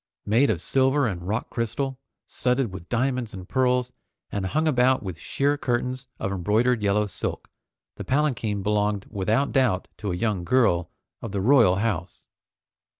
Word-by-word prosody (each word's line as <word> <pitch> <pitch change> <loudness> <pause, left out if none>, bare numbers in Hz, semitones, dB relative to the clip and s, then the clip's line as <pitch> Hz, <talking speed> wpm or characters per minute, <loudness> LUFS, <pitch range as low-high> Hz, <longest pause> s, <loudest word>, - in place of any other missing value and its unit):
Made 115 +7 +3
of 85 -7 0
silver 135 +7 +2
and 90 -5 -3
rock 110 +4 -2
crystal, 130 +3 -2 0.3
studded 125 -4 -1
with 90 -2 -9
diamonds 125 -2 -1
and 95 -1 -9
pearls, 125 0 +1 0.4
and 100 -2 -2
hung 155 +10 0
about 130 -3 +3
with 90 -4 -6
sheer 145 +8 0
curtains 125 +1 -2
of 95 - -3
embroidered 110 +6 +1
yellow 105 +1 +2
silk, 100 - -4 0.5
the - - -5
palanquin 125 -8 0
belonged 105 -1 0
without 110 +7 0
doubt 120 -9 +1
to 105 -2 -3
a - - -1
young 100 -1 -1
girl 90 -7 +2 0.3
of 110 - -6
the 100 - -1
royal 115 -3 +5
house. 100 -4 -3
115 Hz, 155 wpm, -25 LUFS, 100-130 Hz, 0.5 s, royal